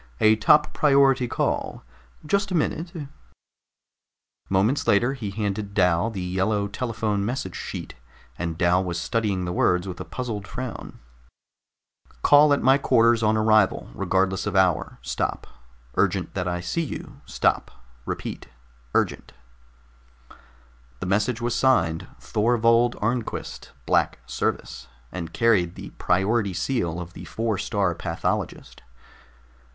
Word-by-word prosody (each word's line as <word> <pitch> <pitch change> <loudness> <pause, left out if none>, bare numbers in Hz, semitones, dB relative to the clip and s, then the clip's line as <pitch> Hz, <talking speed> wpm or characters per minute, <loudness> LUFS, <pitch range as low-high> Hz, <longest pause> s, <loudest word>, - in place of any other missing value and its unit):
"A 110 0 +5
top 150 +7 +4
priority 135 -3 +4
call. - - -2 0.4
Just 200 +6 +1
a 185 - -2
minute." 165 +1 -1 1.6
Moments 100 +9 +1
later 120 +6 +3
he 115 -7 -5
had 100 - -10
handed 100 -1 -2
Dal 90 +2 +3
the 100 -5 -5
yellow 95 +3 0
telephone 110 -2 -2
message 105 -5 -3
sheet, - - -6 0.4
and 85 -1 -4
Dal 90 +2 +3
was 85 -2 -3
studying 100 -2 -1
the 90 - -3
words 90 +1 +2
with 90 -2 -6
a - - -4
puzzled 110 -6 -5
frown: 125 +2 -7 1.3
CALL 145 +1 +6
AT 145 - +2
MY 135 +2 +5
QUARTERS 115 -3 +4
ON 110 0 +2
ARRIVAL 110 - +2
REGARDLESS 95 +3 0
OF 100 - -2
HOUR 90 -5 +2
STOP - - -2 0.5
URGENT 95 -2 0
THAT 90 -2 -2
I 90 0 -2
SEE 90 - -2
YOU 155 - -7
STOP - - +1 0.4
REPEAT - - -5 0.5
URGENT - - 0 1.7
The - - -4
message 105 +5 0
was 120 0 -1
signed 85 -12 +2
THORVOLD 115 +2 +2
ARNQUIST, 115 +1 -3
BLACK - - +2
SERVICE - - -3 0.2
and 85 -3 -6
carried 100 -7 +2
the - - -9
priority 100 +3 +1
seal 90 -4 -1
of 90 0 -8
the - - -9
Four 110 -3 -2
star 100 -4 0
Pathologist. 85 - -3
105 Hz, 130 wpm, -24 LUFS, 90-120 Hz, 1.7 s, CALL